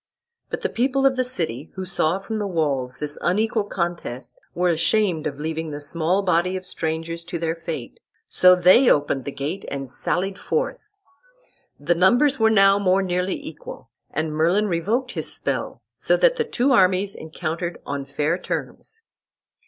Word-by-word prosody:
But - - -4
the - - -1
people 270 +3 +1
of 270 -1 +4
the 255 - +1
city, 160 - -3
who 190 -1 -4
saw 175 -1 +1
from 215 +3 -5
the 205 - -2
walls 140 -8 -1
this 150 0 -4
unequal 215 +3 +1
contest, 170 -10 -4 0.2
were 180 +1 +2
ashamed 170 0 +1
of 140 -1 -6
leaving 160 +1 -3
the 145 -1 -5
small 165 +6 0
body 180 0 +1
of 185 - -8
strangers 165 +1 -3
to 170 - -4
their 165 -1 -1
fate, 165 -7 -7 0.3
so 180 0 +6
they 185 +8 +6
opened 145 -2 +1
the 140 - -4
gate 145 +7 -4
and 135 -1 -5
sallied 190 +9 -2
forth. 470 -3 -3 0.8
The 150 +4 +1
numbers 245 - +3
were 220 0 +5
now 195 -2 +5
more 195 0 +2
nearly 180 0 -1
equal, 150 -6 -10 0.2
and 155 +1 -2
Merlin 170 +7 +2
revoked 210 +9 -1
his - - -2
spell, - - -3
so - - +2
that - - +4
the 465 -2 -1
two 275 - +1
armies 195 -3 +3
encountered 165 +2 -5
on 140 -1 -4
fair 150 +5 -1
terms. 450 - -6
180 Hz, 170 wpm, -23 LUFS, 155-205 Hz, 0.8 s, so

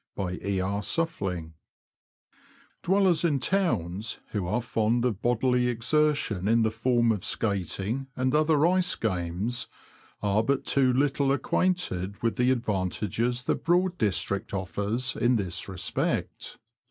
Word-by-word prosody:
— - - -16
E. 95 +1 -2
R. 100 +2 -1
S. 105 - -1 1.9
[f^j^WELLERS 185 -3 +3
in 150 -5 +2
towns 115 - -1
who 100 -5 -2
are 105 - 0
fond 115 0 0
of 110 -5 -1
bodily 125 +1 +2
exertion 125 - +1
in 115 +1 +4
the 110 - +1
form 120 0 +2
of 105 -5 -2
skating 105 +5 -2
and 130 0 0
other 155 0 +3
ice 180 +1 +2
games, 95 +4 -2 0.6
are 100 +1 +2
but 135 +4 0
too 135 -2 +3
little 140 +1 +1
acquainted 135 - 0
with 115 - +1
the 125 +1 +2
advantages 115 +1 -1
the - - +1
Broad 180 +1 +1
district 100 0 -1
offers 105 +6 -2
in 120 +1 +2
this 95 -4 -3
respect. 95 -1 -3
115 Hz, 130 wpm, -27 LUFS, 100-135 Hz, 1.9 s, in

